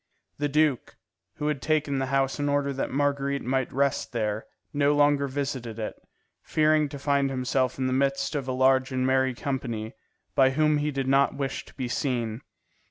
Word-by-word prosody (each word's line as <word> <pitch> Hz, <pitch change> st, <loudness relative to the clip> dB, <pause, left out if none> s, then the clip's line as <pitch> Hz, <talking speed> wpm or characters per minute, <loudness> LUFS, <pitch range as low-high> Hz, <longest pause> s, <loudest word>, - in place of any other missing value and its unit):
The 145 Hz, 0 st, 0 dB
duke, 150 Hz, -3 st, +1 dB, 0.4 s
who 150 Hz, -, -4 dB
had 150 Hz, -3 st, -1 dB
taken 150 Hz, -3 st, +1 dB
the 135 Hz, -, -1 dB
house 135 Hz, +1 st, 0 dB
in 145 Hz, 0 st, 0 dB
order 140 Hz, -1 st, +1 dB
that 135 Hz, -, -2 dB
Marguerite 140 Hz, 0 st, 0 dB
might 130 Hz, +1 st, -1 dB
rest 140 Hz, -1 st, 0 dB
there, 110 Hz, -2 st, -2 dB, 0.3 s
no 145 Hz, 0 st, +3 dB
longer 145 Hz, -1 st, +3 dB
visited 130 Hz, -4 st, -4 dB
it, 110 Hz, -, -3 dB, 0.5 s
fearing 155 Hz, -1 st, +2 dB
to 140 Hz, -, -7 dB
find 140 Hz, 0 st, +1 dB
himself 130 Hz, -1 st, 0 dB
in 130 Hz, -, -1 dB
the 130 Hz, -, 0 dB
midst 140 Hz, +2 st, 0 dB
of 140 Hz, -3 st, -3 dB
a -, -, -1 dB
large 130 Hz, 0 st, +3 dB
and 130 Hz, 0 st, 0 dB
merry 130 Hz, -1 st, +2 dB
company, 120 Hz, -5 st, -3 dB, 0.4 s
by 130 Hz, -1 st, +5 dB
whom 150 Hz, -1 st, +3 dB
he 150 Hz, +1 st, 0 dB
did 135 Hz, -2 st, -2 dB
not 135 Hz, +1 st, +3 dB
wish 135 Hz, -1 st, -3 dB
to -, -, -17 dB
be 130 Hz, -2 st, -3 dB
seen. 120 Hz, -3 st, -2 dB
135 Hz, 185 wpm, -26 LUFS, 130-145 Hz, 0.5 s, by